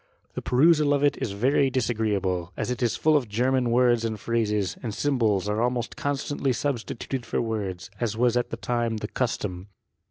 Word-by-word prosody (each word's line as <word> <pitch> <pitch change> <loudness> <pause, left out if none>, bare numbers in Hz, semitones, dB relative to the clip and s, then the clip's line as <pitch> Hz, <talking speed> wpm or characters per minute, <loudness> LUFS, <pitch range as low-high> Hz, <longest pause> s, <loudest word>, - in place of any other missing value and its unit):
The - - -4
perusal 150 +2 +4
of 140 - 0
it 145 - +3
is 100 - -2
very 135 +6 +2
disagreeable, 105 -8 -1
as - - -2
it 125 - -3
is 120 -2 +1
full 155 0 +3
of 130 -7 +1
German 125 +3 +1
words 120 -1 +3
and 110 -2 -2
phrases, 105 -5 0
and 110 -4 -4
symbols 110 -8 +1
are 105 +2 0
almost 125 0 -1
constantly 140 -1 -1
substituted 125 -1 -3
for - - -2
words, 100 -5 -3
as 110 -3 -1
was 120 0 +3
at 125 - 0
that - - -6
time 120 -2 0
the 105 - -4
custom. 105 -7 -3
120 Hz, 185 wpm, -26 LUFS, 105-130 Hz, -, perusal